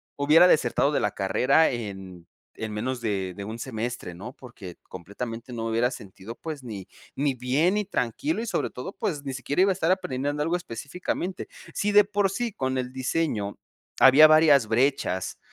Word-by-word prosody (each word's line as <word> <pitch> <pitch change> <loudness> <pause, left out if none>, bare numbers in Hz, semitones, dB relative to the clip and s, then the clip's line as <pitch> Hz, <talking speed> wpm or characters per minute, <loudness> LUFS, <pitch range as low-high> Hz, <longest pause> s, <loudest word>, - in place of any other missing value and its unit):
hubiera 155 +5 +6
desertado 145 -3 +2
de 145 - +1
la 105 - 0
carrera 130 +11 +2
en 95 -7 -7 0.3
en 110 -1 -5
menos 125 +4 -3
de 95 -5 -2
de 100 +1 -7
un 110 +2 -6
semestre, 120 -5 -5
¿no? 105 +9 -9
Porque 105 -9 -11
completamente 115 +7 -7
no 115 -1 -4
hubiera 115 +2 +1
sentido, 105 -1 -10
pues 155 -4 -7
ni 105 -6 -7 0.3
ni 140 0 0
bien, 135 - +1
ni 210 -1 0
tranquilo 150 - -2
y 235 - -4
sobre 225 - -1
todo, 125 +9 -7
pues 150 -6 -3
ni 135 -1 -4
siquiera 135 +7 -1
iba 195 0 +4
a - - +2
estar 175 -3 -1
aprendiendo 145 -4 -1
algo 165 +3 0
específicamente. 175 +6 -5 0.3
Si 205 - 0
de 210 - +8
por 205 -1 0
sí 235 +4 -2
con 130 -7 -2
el 125 0 -3
diseño 130 -5 -2 0.4
había 140 +4 +8
varias 155 -6 +5
brechas 115 -6 0
130 Hz, 180 wpm, -26 LUFS, 110-155 Hz, 0.4 s, de